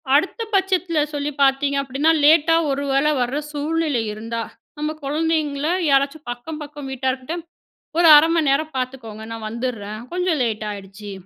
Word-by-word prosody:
அடுத்த 375 +9 +1
பட்சத்தில 370 -4 +1
சொல்லி 290 0 -2
பார்த்தீங்க 280 +1 +3
அப்படீன்னா, 275 +4 +1
லேட்டா 325 +2 +6
ஒரு 280 +1 -1
வேள 275 +2 +2 0.2
வர 250 +4 -1
சூழ்நிலை 300 -3 -1
இருந்தா, 230 +2 -4 0.4
நம்ம 300 +1 -2
குழந்தைங்கள 300 0 0 0.2
யாராச்சும் 275 +1 +1
அக்கம் 300 +6 -7
பக்கம் 290 -2 -8
வீட்டார்க்கிட்ட, 265 +4 -2 0.6
"ஒரு 340 -1 +5
1/2 315 +2 +5
மணி 310 -4 +2
நேரம் 310 +2 0
பார்த்துக்கோங்க. 240 -4 -5
நான் 225 -1 -6
வந்துடறேன். 220 -2 -4
கொஞ்சம் 360 -4 0
லேட்டாயிடுச்சு." 210 -2 -5
280 Hz, 140 wpm, -21 LUFS, 245-310 Hz, 0.6 s, லேட்டா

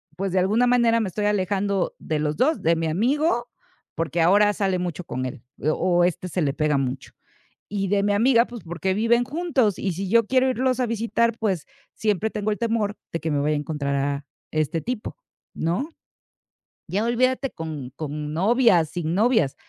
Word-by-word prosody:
pues, 195 0 -2
de 185 - +2
alguna 215 +7 +3
manera 235 -2 +4
me 220 - -1
estoy 205 +3 -2
alejando 200 -1 0
de 155 -1 -2
los 150 0 -1
2, 310 +5 +2
de 165 +1 +3
mi 165 0 -1
amigo, 240 - +1 0.5
porque 165 +1 -1
ahora 205 +5 +5
sale 195 -3 0
mucho 180 -1 -4
con 130 -5 -4
él, 125 -2 -6 0.2
o, 175 +4 +2
este, 180 +1 -2
se 180 +1 -2
le 140 -3 +1
pega 150 0 +1
mucho, 130 -1 -3 0.6
y 195 -1 -2
de 200 0 +2
mi 205 0 +2
amiga, 235 +3 +4
pues, 240 -2 -10
porque 175 +3 -2
viven 230 +4 +3
juntos. 265 - 0
Y 190 -3 -1
si 195 +3 -4
yo 230 +1 +4
quiero 260 +2 +3
irlos 255 0 0
a 250 - +2
visitar, 230 0 0
pues, 190 -8 -1 0.3
siempre 215 0 0
tengo 215 0 -2
el 210 - -1
temor 225 -3 -1 0.2
de 165 - -2
que 160 -1 -3
me 145 - +1
vaya 150 +1 +1
a - - 0
encontrar 145 -2 -2
a 140 +1 -1 0.3
este 155 +1 -1
tipo, 245 -3 -4 0.4
¿no? 175 - -1 1.0
Ya 200 +4 -1
olvídate, 255 +3 +1
con 155 -6 -6
con 150 0 -5
novias, 190 - +3
sin 165 -1 -3
novias. 220 - +2
195 Hz, 190 wpm, -24 LUFS, 160-230 Hz, 1.0 s, ahora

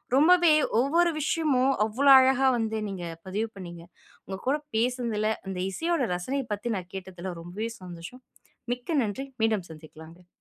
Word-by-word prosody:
ரொம்பவே 340 +3 +6 0.3
ஒவ்வொரு 335 +7 +3
விஷயமும், 275 -4 +2
அவ்வளோ 270 +6 +3
அழகா 265 0 +4
வந்து 220 -1 -1
நீங்க 185 -3 -5 0.2
பதிவு 215 +4 -2
பண்ணிங்க. 170 -2 -9 0.4
உங்க 190 0 -5
கூட 280 +3 +3 0.2
பேசுனதில, 230 -3 0 0.2
இந்த 180 -1 -3
இசையோட 330 - -1
ரசனையப் 250 +7 -3
பத்தி 220 +2 -3
நான் 180 -1 -8
கேட்டதில, 185 -1 -6
ரொம்பவே 190 +7 -5
சந்தோஷம். 180 +8 -10 0.5
மிக்க 275 +5 -2
நன்றி. 225 +6 -4 0.2
மீண்டும் 215 -5 +1
சந்திக்கலாங்க. 160 +2 -13
225 Hz, 140 wpm, -27 LUFS, 185-270 Hz, 0.5 s, ரொம்பவே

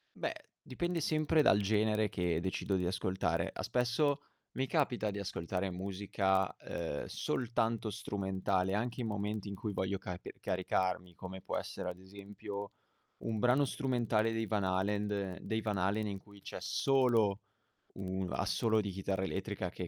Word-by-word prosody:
Beh, - - -1 0.3
dipende 175 +6 -1
sempre 155 0 +3
dal 105 -8 +6
genere 105 +1 +3
che 90 -3 0
decido 95 +2 0
di 90 -1 +1
ascoltare. 95 +1 0
Ah - - -4
spesso, 125 +4 +2 0.4
mi 130 0 +1
capita 130 -9 +1
di 100 0 -3
ascoltare 95 0 -2
musica, 95 0 +1
ehm, 80 -4 -3
soltanto 115 -2 0
strumentale, 95 -2 0
anche 115 +4 -1
in 115 - -1
momenti 105 0 -2
in 100 - -4
cui 105 +2 -3
voglio 95 +1 0
carpe 90 -2 -6
caricarmi, 90 -1 0
come 95 +1 -7
può - - -3
essere 90 - -4
ad 90 0 -6
esempio 100 +1 -7 0.5
un 110 -1 -1
brano 125 +5 +5
strumentale 120 -5 +1
dei 115 0 0
Van 105 -2 +1
Halend 100 0 0
dei 110 0 -1
Van 105 -2 0
Halen, 100 +3 +1
in 100 -1 -3
cui 100 0 -16
c'è - - -6
solo 120 -7 +3 0.5
un 95 -1 -2
assolo 110 +2 +2
di 100 - -3
chitarra 95 0 -1
elettrica 95 -1 -2
che 90 0 -5
100 Hz, 155 wpm, -34 LUFS, 95-110 Hz, 0.5 s, dal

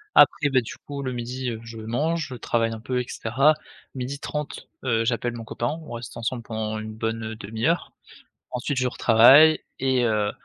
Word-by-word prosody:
Après 150 - +6
beh, 130 -3 +3
du - - -7
coup, 140 -1 -5
le 130 -1 -2
12:00, 125 +1 -3
heu, 110 -1 -5
je 115 0 -9
mange, 150 +9 -1
je - - -5
travaille 115 -1 0
un 110 - -6
peu 125 +2 -1
et 125 - -4
cetera. 135 +7 +2 0.4
12:30, 140 +3 -5 0.2
heu, 115 -3 +1
j'appelle 120 +1 -1
mon 115 - -7
copain, 120 +7 -3
on - - -9
reste 120 0 -7
ensemble 115 +1 -3
pendant 110 -1 -3
une 110 0 -6
bonne 110 0 -3
1/2 110 +1 -4
heure. 165 +2 0 0.6
Ensuite 125 +2 -2
je 130 -1 +2
retravaille 135 +8 +7 0.2
et 130 -1 +2
heu, 105 -2 +1
120 Hz, 190 wpm, -25 LUFS, 115-130 Hz, 0.6 s, retravaille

